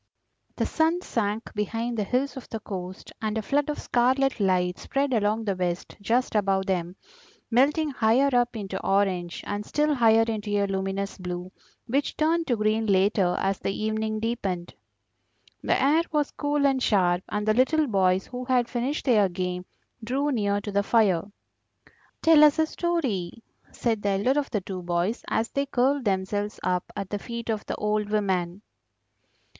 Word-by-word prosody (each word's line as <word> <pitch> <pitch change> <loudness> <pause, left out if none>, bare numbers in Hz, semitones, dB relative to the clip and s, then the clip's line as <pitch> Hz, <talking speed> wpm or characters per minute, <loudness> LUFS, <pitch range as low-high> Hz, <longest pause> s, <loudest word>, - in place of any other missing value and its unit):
The - - 0
sun 330 +3 +1
sank 215 0 -2
behind 225 +3 -2
the 215 - 0
hills 255 +5 -1
of 265 - -9
the 225 - -4
coast, 185 -3 -7
and 215 0 -1
a 220 - -2
flood 290 +6 0
of 300 - -2
scarlet 260 +2 +1
light 180 -2 +1
spread 275 0 -1
along 220 0 +1
the 200 -2 0
West 180 -1 -3
just 240 +5 +1
above 195 -2 +1
them, 180 -2 -2 0.6
melting 290 +6 +3
higher 255 +3 +3
up 245 0 +2
into 195 -3 -5
orange, 190 -3 0
and 205 0 -3
still 300 +6 +1
higher 225 -4 +5
into 220 -2 -3
a 200 - +2
luminous 195 +1 -3
blue, 180 0 -5 0.3
which 275 +4 -1
turned 325 +2 +1
to 245 - +2
green 215 +1 +1
later 195 -2 +3
as 195 0 0
the 195 - -2
evening 220 0 -1
deepened. 200 -6 -3 0.9
The - - +1
air 295 +5 +4
was 300 -2 0
cool 290 -1 0
and 270 -2 +2
sharp, 180 -6 +2
and 210 0 -2
the 215 - +4
little 300 +6 +3
boys, 190 -5 +2
who 250 0 -6
had 250 -2 +2
finished 255 +6 -2
their 215 -7 +4
game, 180 0 -3 0.4
drew 275 +6 0
near 205 -4 0
to 205 - -5
the 200 0 +2
fire. 200 -4 +2 0.9
"Tell 320 -2 +7
us 300 0 +6
a 320 - +3
story," 265 - -2 0.3
said 225 -3 -1
the 205 - 0
elder 205 +9 +2
of 285 - -3
the 210 - -1
two 185 0 -6
boys, 175 +5 -1
as 225 +1 0
they 280 0 -1
curled 270 +1 +1
themselves 205 +2 -1
up 180 -1 -1
at 195 - -5
the 205 - -2
feet 235 +2 -6
of 215 -1 -3
the - - -2
old 210 0 -1
woman. 190 -2 -1
215 Hz, 175 wpm, -26 LUFS, 195-255 Hz, 0.9 s, Tell